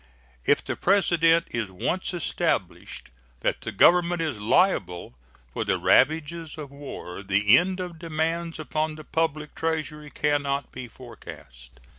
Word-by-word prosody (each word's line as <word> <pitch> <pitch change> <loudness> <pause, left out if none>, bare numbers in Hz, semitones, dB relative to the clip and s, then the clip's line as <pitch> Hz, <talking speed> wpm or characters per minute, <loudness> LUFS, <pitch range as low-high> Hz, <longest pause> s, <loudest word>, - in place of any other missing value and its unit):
If - - +3
the - - -3
precedent 170 -4 +3
is 115 -4 -2
once 175 - -2
established 175 -3 -2 0.3
that - - -1
the - - -5
Government 175 - +4
is 150 -10 -2
liable 105 - +1 0.4
for - - -2
the - - 0
ravages 160 +1 +2
of 145 -3 -8
war, 140 -10 -8
the 100 +3 +4
end 185 +4 +2
of 175 -3 -6
demands 165 +1 -2
upon 155 0 -2
the 155 - -10
public 155 -1 -2
Treasury 155 -2 -3
can 145 -1 0
not 140 0 -3
be 130 -1 -7
forecast. 60 - -13
155 Hz, 140 wpm, -25 LUFS, 125-165 Hz, 0.4 s, Government